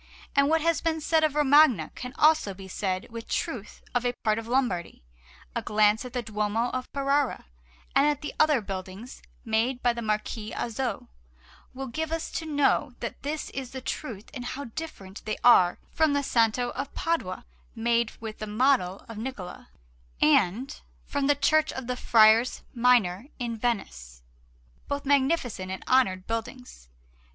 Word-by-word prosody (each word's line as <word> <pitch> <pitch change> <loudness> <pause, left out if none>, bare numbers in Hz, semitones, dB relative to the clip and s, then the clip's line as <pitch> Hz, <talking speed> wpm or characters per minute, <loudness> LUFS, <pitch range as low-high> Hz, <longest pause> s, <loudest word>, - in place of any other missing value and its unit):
And 280 0 +4
what 325 0 +3
has 335 +1 +1
been 325 -1 0
said 315 +1 +2
of 305 -2 +1
Romagna 290 - +5
can 250 - -6
be 260 - -17
also 305 -10 +4
said 185 +2 -2
with 230 0 -7
truth 245 - -4
of 245 - +1
a 245 0 0
part 215 0 +2
of 225 - -8
Lombardy. 235 - -1 0.5
A - - 0
glance 210 0 +3
at 250 -1 -9
the 245 -2 -2
Duomo 215 +2 -1
of 255 0 -4
Ferrara, 275 - 0 0.5
and 280 - +5
at 295 -1 0
the 295 - -4
other 300 -5 +4
buildings 195 +4 -7 0.2
made 235 +3 0
by 245 -1 +3
the 235 - -5
Marquis 215 0 -3
Azzo, 240 +2 -3 0.7
will 270 +1 -4
give 315 +5 -4
us 325 0 -3
to 320 - -4
know 290 -3 +1
that 235 - -6
this 295 +2 -4
is 260 -2 -6
the 260 - -4
truth 235 -5 -6
and 245 - -6
how 265 +3 -5
different 225 -8 -8
they 215 - -2
are 180 -7 +6
from 315 -2 +2
the 285 0 +1
Santo 240 -1 +2
of 275 0 -5
Padua, 325 - -2 0.3
made 235 0 +1
with 220 -1 -7
the 215 - -5
model 210 -4 +1
of 230 - -9
Niccola, 220 -7 -7 0.5
and 200 - +2 0.2
from 285 -1 -1
the 290 - +4
Church 310 +2 +3
of 260 - -6
the 250 +1 -2
Friars 225 +1 +4
Minor 235 -4 +3
in 235 -2 -3
Venice, 65 - -3 0.6
both 285 0 -3
magnificent 265 - +1
and 190 - -6
honoured 190 -8 +3
buildings. 230 - -6
245 Hz, 165 wpm, -27 LUFS, 215-280 Hz, 0.7 s, are